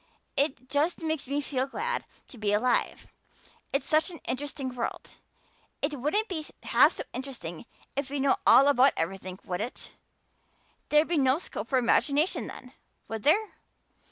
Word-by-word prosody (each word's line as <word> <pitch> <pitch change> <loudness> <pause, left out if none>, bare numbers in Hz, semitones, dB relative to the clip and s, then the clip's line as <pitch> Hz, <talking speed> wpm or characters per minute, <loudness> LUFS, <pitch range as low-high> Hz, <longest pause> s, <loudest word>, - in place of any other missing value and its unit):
It 270 -3 0
just 295 +6 0
makes 315 -4 -1
me 285 +2 0
feel 265 -2 -1
glad 475 - -3 0.2
to 245 - -12
be 205 -1 +1
alive 245 +4 +1 0.7
it's 275 - -1
such 310 +4 +3
an 345 - -8
interesting 275 0 -3
world. 245 -1 -4 0.7
It 290 -1 -2
wouldn't 360 - +1
be 330 -6 -3 0.2
half - - +5
so - - -4
interesting 245 - -6 0.3
if 275 0 -2
we 285 - -3
know 270 0 +3
all 275 - +8
about 275 -1 +5
everything, 185 +2 -3
would 180 -1 -3
it? 240 +3 -5 1.0
There'd 300 +1 +4
be 335 -3 +1
no 265 0 +4
scope 230 - -6
for 265 - +2
imagination 285 - +2
then, 250 0 -10 0.3
would 225 -1 -4
there? 400 - +3
275 Hz, 155 wpm, -28 LUFS, 250-300 Hz, 1.0 s, all